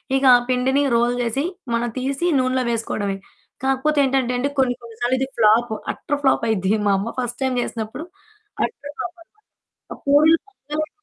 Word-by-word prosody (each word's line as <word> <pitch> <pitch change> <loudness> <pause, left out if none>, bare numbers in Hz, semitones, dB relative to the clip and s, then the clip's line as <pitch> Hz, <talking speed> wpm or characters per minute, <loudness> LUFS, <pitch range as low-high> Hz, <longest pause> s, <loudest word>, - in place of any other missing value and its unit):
ఇక 270 - +1
ఆ - - +7
పిండిని 265 +3 +2
రోల్ 240 +1 +2
జేసి 240 +4 -1 0.3
మనం 235 0 0
తీసి 275 +6 -1
నూనెలో 255 0 +1
వేసుకోవడమే. 205 -3 -2 0.5
కాకపోతే 270 +3 +1
ఏంటంటేండి 260 0 +1
కొన్ని, 250 -2 +3
కొన్నిసార్లు 240 +2 -2
ఇది 265 - 0
ఫ్లాప్, 220 +1 +4 0.2
అట్టర్ 290 0 -3
ఫ్లాప్ 265 - +3
అయ్యిద్ది. 195 -1 +1
మా 200 - +4
అమ్మ 230 +4 -3
ఫస్ట్ 245 0 -3
టైమ్ 260 -1 0
జేసినప్పుడు 225 +8 -5 0.6
అట్టర్ 290 -10 -8
ఫ్లాప్ 355 -1 -5
అనమాట. 425 +5 -39 0.6
ఆ - - -17
పూరీలు 305 +3 +5
పొంగలేదు. 310 -4 -5
255 Hz, 160 wpm, -21 LUFS, 235-285 Hz, 0.6 s, ఆ